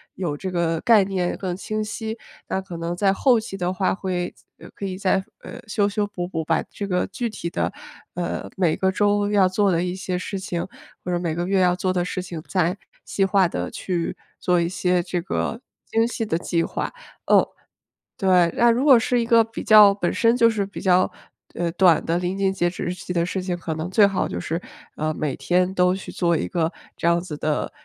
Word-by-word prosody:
有 170 -6 -2
这 185 +6 -5
个 170 -2 0
概 225 -5 +5
念 190 -2 -2
更 185 -2 -3
清 215 +3 -3
晰。 220 +1 -5 0.3
那 - - -1
可 185 -2 -9
能 170 +1 -3
在 195 +1 +2
后 245 +3 +3
期 220 -3 -7
的 180 -1 -1
话 185 0 0
会 180 -2 -3 0.4
可 200 - -5
以 185 -1 -4
再 190 0 +1 0.4
修 210 -1 +1
修 205 +1 -1
补 190 -4 -5
补 165 -3 -3
把 160 +1 +1
这 205 - -7
个 180 -2 0
具 235 +5 -3
体 200 -5 -5
的， - - -1 0.4
呃， 175 0 -3
每 175 -4 +2
个 190 0 +1
周 205 +1 +2
要 200 -3 +5
做 195 +1 +2
的 170 -1 +1
一 180 0 -2
些 185 -1 -3
事 195 +2 -4
情， 180 -2 -4 0.4
或 180 - -2
者 175 - +1
每 170 -2 -2
个 175 +2 -2
月 195 0 +2
要 180 -1 +4
做 185 0 -1
的 180 -1 +1
事 185 +1 -3
情 175 -3 -7
再 180 0 +1 0.3
细 195 - 0
化 195 -1 +3
地 - - -4
去 175 -3 -3 0.2
做 180 -1 +2
一 170 - +1
些 180 0 +1
这 175 0 -2
个 225 +5 -2 0.3
精 225 +1 +1
细 235 -1 -3
的 165 -6 0
计 170 -1 0
划。 - - -3 0.3
嗯， - - +5 0.7
对， 180 -3 +4
那 240 - +5
如 240 +3 +1
果 265 -5 +8
是 245 +2 +1
一 - - -1
个 230 0 +5
比 225 0 -7
较 210 -2 +8
本 190 -3 -1
身 230 0 +3
就 230 -2 +5
是 210 -2 -1
比 200 - -9
较， 185 -1 +3 0.4
呃， 170 -1 -1
短 175 -1 +4
的 165 - +1
临 180 +2 -2
近 195 -1 +1
截 175 -2 +1
止 175 - -6
日 175 - -2
期 180 - -8
的 170 -1 +1
事 185 +2 -3
情， 180 -1 -2
可 165 -2 -4
能 160 +3 -4
最 205 +2 +5
好 195 -2 0
就 85 - -4
是， 165 - -3 0.4
呃， 155 +1 0
每 150 -3 -2
天 180 +1 +1
都 180 -1 +3
去 190 - -8
做 170 -2 +1
一 - - -2
个 165 -2 0 0.3
这 - - -1
样 170 0 +4
子 170 -4 -6
的， 150 0 -1
185 Hz, 240 characters per minute, -23 LUFS, 175-200 Hz, 0.7 s, 果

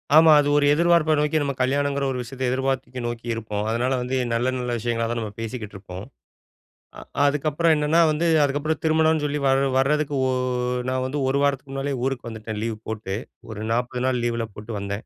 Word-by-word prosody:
ஆமா. 160 0 +8
அது 145 - +2
ஒரு 145 - +3
எதிர்ப்பார்ப்ப 170 -1 +3
நோக்கி, 150 +1 +1
நாம 140 -1 -1
கல்யாணங்கிற 140 +1 +1
ஒரு 125 - -3
விஷயத்த 130 +2 -6
எதிர்பார்த்து 130 -1 -2
நோக்கி 120 0 -6
இருப்போம். 105 -2 -3
அதனால 120 +3 0
வந்து 130 +1 -1 0.2
நல்ல 125 +2 +1
நல்ல 125 -1 -3
விஷயங்களா 115 0 -1
தான் 120 - -2
நம்ம 105 -2 -5
பேசிக்கிட்டு 115 -2 -6
இருப்போம். 95 0 -9 0.9
அ - - -9 0.2
அதுக்கப்புறம் 150 +3 +2
என்னன்னா, 150 +2 +2
வந்து 155 +3 0 0.2
அதுக்கப்புறம் 145 +2 -1
திருமணம்னு 160 -1 +3
சொல்லி 150 0 -1
வர 135 +1 +3
வரதுக்கு, 145 +1 +1
ஒ - - +1 0.6
நான் 130 0 -1
வந்து 145 +3 -3
1 135 +1 +1
வாரத்துக்கு 140 -1 -1
முன்னாலேயே 135 -1 -2
ஊருக்கு 130 -3 -3
வந்துட்டேன் 110 -1 -6
லீவ் 115 -2 -3
போட்டு. 105 -3 -4 0.4
ஒரு 105 0 -6
40 125 +1 -1
நாள் 125 -2 +1
லீவுல 115 -1 -1
போட்டு 110 +2 -8
வந்தேன். 100 +3 -5
130 Hz, 185 wpm, -23 LUFS, 115-145 Hz, 0.9 s, ஆமா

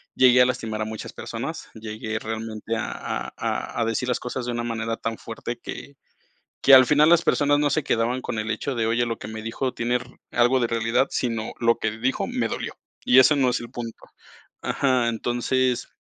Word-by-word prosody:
llegué 125 -1 +6
a - - +7
lastimar 115 -4 -2
a - - 0
muchas 110 0 -6
personas. - - -6
Llegué 110 0 -5
realmente 110 0 -4
a - - -3
a - - -4
a - - -2
a - - +2
decir 115 +2 -1
las 125 - 0
cosas 125 0 -4
de 120 - -2
una 120 0 -2
manera 115 -1 -2
tan 115 -1 -3
fuerte, 115 +1 -6
que 140 +3 -8 0.7
que 135 - +6
al 130 -1 +10
final 150 +3 +5
las 170 -1 +6
personas 145 -3 +2
no 145 0 +2
se 150 +2 0
quedaban 120 +1 0
con 110 - -3
el 110 0 -3
hecho 135 +5 -2
de, 115 -2 0
oye, 120 +2 +2
lo 115 -1 -3
que - - -7
me 110 0 -7
dijo 125 +4 -2
tiene 120 +1 0
re 125 0 -12 0.2
algo 120 +2 +3
de 120 - +2
realidad, 115 +3 +1
sino, 115 -3 -2
lo 115 -1 +3
que 110 - -1
dijo 130 +3 0
me - - -1
dolió, - - -4 0.3
y 125 - +6
eso 150 +3 +6
no 130 -3 +3
es 125 - 0
el 120 - -8
punto. 115 -2 -7 0.6
Ajá, 130 -4 +1
entonces, 120 +2 0
120 Hz, 215 wpm, -24 LUFS, 115-130 Hz, 0.7 s, al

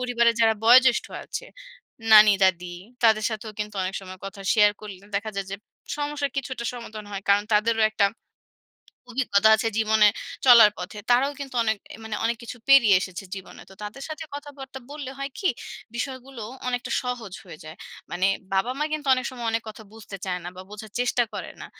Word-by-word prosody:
পরিবারের 235 -2 +2
যারা 225 -1 +5
বয়জ্যেষ্ঠ 255 +1 +6 0.2
আছে, - - -6 0.7
নানি-দাদি, 190 -4 +6 0.3
তাদের 220 -1 +4
সাথেও 220 0 -6
কিন্তু 210 0 -4
অনেক 185 +1 -3
সময় 185 -1 -10
কথা 195 0 -9
share 210 -1 +5
করলে, 210 -3 -8 0.2
দেখা 215 +2 -3
যায় 195 -1 -2
যে, 200 - -3 0.4
সমস্যার 290 -1 -2
কিছুটা 260 -3 -4
সমাধান 220 -3 -8
হয়। 195 - -5
কারণ 200 +1 +4
তাদেরও 225 +1 +2
একটা 205 -2 +3 1.0
অভিজ্ঞতা 220 -4 +3
আছে 225 +1 -1
জীবনে 220 -1 +5 0.4
চলার 235 -4 +9
পথে। 200 +4 -7
তারাও 265 +4 +4
কিন্তু 270 -2 -7
অনেক 220 -1 +1 0.2
এ - - -8
মানে 220 -1 -4
অনেক 230 +1 +1
কিছু 235 - -8
পেরিয়ে 240 -7 +7
এসেছে 185 +1 -6
জীবনে। 190 0 -10
তো - - -13
তাদের 210 +7 -7
সাথে 310 +1 -6
কথাবার্তা 280 -2 -9
বললে 290 -3 -6
হয় 275 0 -4
কী, 380 - +2 0.5
বিষয়গুলো 260 -1 -5 0.3
অনেকটা 245 0 -3
সহজ 245 -6 -5
হয়ে 170 -4 -11
যায়। 155 +2 -10 0.3
মানে 185 +2 +1 0.3
বাবা-মা 255 +9 0
কিন্তু 300 -2 -3
অনেক 255 - -3
সময় 245 -2 -6
অনেক 225 0 -1
কথা 220 0 -10
বুঝতে 215 -3 -9
চায় 180 -2 -3
না 175 - -4
বা 185 - -8
বোঝার 210 0 -10
চেষ্টা 245 0 +2
করে - - -6
না। - - -7
225 Hz, 180 wpm, -25 LUFS, 205-255 Hz, 1.0 s, চলার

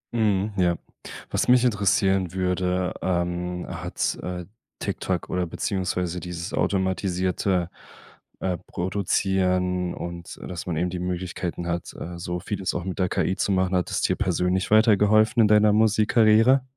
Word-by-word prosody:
Mhm. 105 -2 +1
Ja. 90 -2 +3 0.6
Was - - 0
mich 125 0 +5
interessieren 95 -4 +2
würde, 90 0 0
ähm, 90 0 -2
hat, 90 0 -2
äh, 90 -1 -5 0.3
TikTok - - -2
oder 90 -1 -1
beziehungsweise 90 -2 -2
dieses 90 +2 -6
automatisierte, 95 -1 0 0.7
äh, 90 -2 -1
Produzieren 90 -1 0
und, 85 0 -7
dass 90 -1 -6
man 80 - -2
eben 90 +2 0
die 90 - -4
Möglichkeiten 90 -1 -4
hat, 85 0 -3
äh, 85 0 -6
so 90 0 -3
vieles 95 0 -3
auch 85 - -2
mit 95 0 -5
der 90 -1 +1
KI 95 - 0
zu - - 0
machen, 95 -1 +1
hat 90 - 0
es - - 0
dir - - +2
persönlich 90 +1 0
weitergeholfen 110 +1 +5
in 105 - +5
deiner 105 0 +5
Musikkarriere? 110 +3 +4
90 Hz, 145 wpm, -24 LUFS, 90-100 Hz, 0.7 s, mich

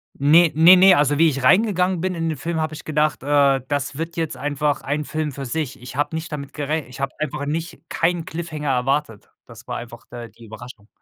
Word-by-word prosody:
Ne, 160 +4 +5
ne, 165 +4 +8
ne, 185 0 +7
also, 145 0 +2
wie 165 - +6
ich 135 -3 -4
reingegangen 185 - +3
bin 185 0 -2
in 165 -1 -2
den 155 - -3
Film, 165 +3 -3
habe 155 0 -2
ich 150 - -9
gedacht, 150 -3 0
äh, 140 -2 +3
das 145 0 -3
wird 165 +1 -5
jetzt 160 -5 -2
einfach 145 +2 -1
ein 145 +1 -3
Film 155 -2 -3
für 135 0 -7
sich. 145 +1 -4
Ich 125 0 -10
habe 145 +3 -1
nicht 160 +1 -5
damit 140 -2 -6
gerech 150 -1 -3
ich 125 +1 -12
habe 135 -1 -2
einfach 150 -1 -3
nicht 160 +3 -4
keinen 170 0 0
Cliffhanger 155 -3 -5
erwartet. 125 -3 -1 0.2
Das 115 0 -15
war 125 - -4
einfach, 120 -1 -10
äh, 120 -1 -8
die 115 +1 -16
Überraschung. 110 -1 -12
150 Hz, 225 wpm, -21 LUFS, 135-160 Hz, 0.2 s, ne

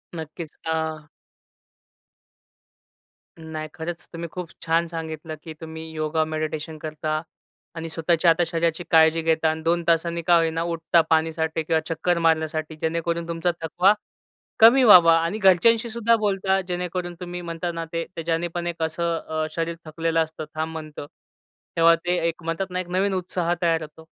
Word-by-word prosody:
नक्कीच 160 0 -7
अ 160 0 +1 2.6
नाही, 160 -1 -6
खरंच 165 +1 -6
तुम्ही 170 0 -5
खूप 180 -2 -6
छान 165 +1 +1
सांगितलं 160 -1 -6
की 160 - -8
तुम्ही 160 0 -7
योगा 155 0 0
मेडिटेशन 155 0 -4
करता 155 0 -3 0.5
आणि 165 0 -5
स्वतःच्या 165 +1 +2
आता 165 +1 +2
शरीराची 165 0 -1
काळजी 160 0 +5
घेता 160 0 +2
आणि 160 0 -3
2 170 +1 +1
तासांनी 170 0 +1
का 175 - +6
होई 165 -1 +2
ना 165 +1 -2
उठता 170 0 +2
पाणीसाठी 160 0 +1
किंवा 160 0 +1
चक्कर 175 +2 0
मारण्यासाठी 160 -1 0
जेणेकरून 170 +1 -1
तुमचा 170 +1 0
थकवा 180 +5 +3 0.7
कमी 235 +4 +8
व्हावा 175 -7 +8
आणि 195 +6 -2
घरच्यांशी 220 +5 +4
सुद्धा 230 0 +2
बोलता 195 -2 +1
जेणेकरून 180 0 -3
तुम्ही 180 -1 -6
म्हणता 170 0 -4
ना 165 -1 -4
ते, 165 0 -1
ते 165 - -3
ज्याने 165 +1 0
पण 175 0 -4
एक 170 -1 -5
असं 165 +1 -1
अ, 155 0 -1
शरीर 165 0 -2
थकलेलं 165 +1 0
असतं 160 0 -8
थांब 160 +1 -2
म्हणतं 155 -2 -7 0.7
तेव्हा 165 0 +6
ते 175 +2 -1
एक 170 +1 -4
म्हणतात 165 +3 -2
ना, 180 - -2
एक 185 - -4
नवीन 190 +2 +1
उत्साह 180 -2 -1
तयार 165 -1 +2
होतो. 155 +1 -11
165 Hz, 160 wpm, -24 LUFS, 160-175 Hz, 2.6 s, कमी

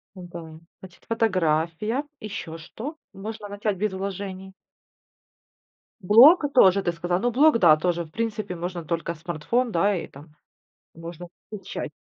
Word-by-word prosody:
Да. 170 -3 -10 0.2
Значит, 185 -2 -15
фотография, 185 - 0 0.2
ещё 200 -6 -6
что? 235 - -8 0.2
Можно 205 +2 -7
начать 205 -1 -2
без 210 0 -1
вложений? 190 0 -6 1.5
Блог, 260 - +8
э, 285 - -1
тоже 200 -7 +5
ты 175 - 0
сказала, 175 +1 -2
ну, 245 +4 0
блог, 280 -1 +4
да, 155 -4 +6
тоже, 170 +1 -1
в - - -17
принципе, 215 -2 -3
можно 175 0 -5
только 170 +1 -3
смартфон, 175 +9 -2
да, 200 +4 +2
и 175 - -4
там, 150 +3 -15 0.6
можно 165 +1 -9 0.2
получать. 210 -2 -6
190 Hz, 140 wpm, -24 LUFS, 170-215 Hz, 1.5 s, Блог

